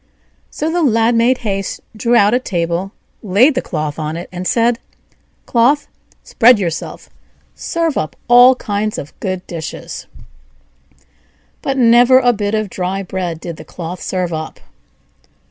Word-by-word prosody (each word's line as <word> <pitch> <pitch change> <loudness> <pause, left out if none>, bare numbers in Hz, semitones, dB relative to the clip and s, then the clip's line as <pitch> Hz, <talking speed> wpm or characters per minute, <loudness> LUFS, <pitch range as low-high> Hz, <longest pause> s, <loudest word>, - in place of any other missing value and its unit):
So 315 +2 -3
the 350 +1 0
Lad 230 -4 +3
made 235 +2 +3
haste, 195 -2 -2 0.2
drew 235 +2 +1
out 205 -1 +4
a 250 - +3
table, 175 -3 -2 0.3
laid 220 +9 +4
the 260 - -1
cloth 155 -3 -4
on 155 +1 -3
it, 175 - -8
and 180 0 -5
said: 235 0 +2 0.7
"Cloth, 255 +5 +2 0.4
spread 245 0 +5
yourself, 170 -5 -4
and - - -34 0.4
serve 330 -3 -1
up 155 -1 -4
all 245 +2 +7
kinds 210 -2 -3
of 145 - -7
good 185 -2 -4
dishes." 165 -3 -7 1.5
But 270 0 -2
never 245 +1 +6
a 245 -2 +4
bit 205 0 -2
of 215 -1 -1
dry 190 +1 -3
bread 180 -3 -4
did 170 -1 -7
the - - -10
cloth 170 +2 -7
serve 180 -2 -2
up. 155 0 -6
205 Hz, 150 wpm, -17 LUFS, 175-245 Hz, 1.5 s, all